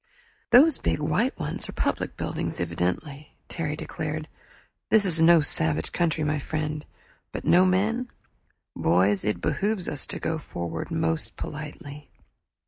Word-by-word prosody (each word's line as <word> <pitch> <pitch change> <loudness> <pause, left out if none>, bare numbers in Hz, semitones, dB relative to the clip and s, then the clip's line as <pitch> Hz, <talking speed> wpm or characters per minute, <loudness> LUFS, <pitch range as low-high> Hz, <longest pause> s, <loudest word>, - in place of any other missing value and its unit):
"Those 275 +5 +6
big 80 0 -1
white - - 0
ones - - -4
are - - -6
public - - -2
buildings - - -3
evidently," 90 - -3
Terry 150 -3 -3
declared. 155 0 -5 0.6
"This 215 -2 +5
is 165 -3 +5
no 165 0 +7
savage 80 - +3
country, 165 -2 0
my 150 0 0
friend. 155 +1 -3 0.5
But - - -6
no 185 +1 +5
men? 220 +7 +1 0.7
Boys, 95 +4 +2
it 105 +1 -1
behooves 205 -3 -1
us 145 - -3
to - - -6
go 160 -1 -2
forward 85 - -5
most 160 -1 -1
politely." 150 -1 -8
155 Hz, 135 wpm, -26 LUFS, 135-170 Hz, 0.7 s, no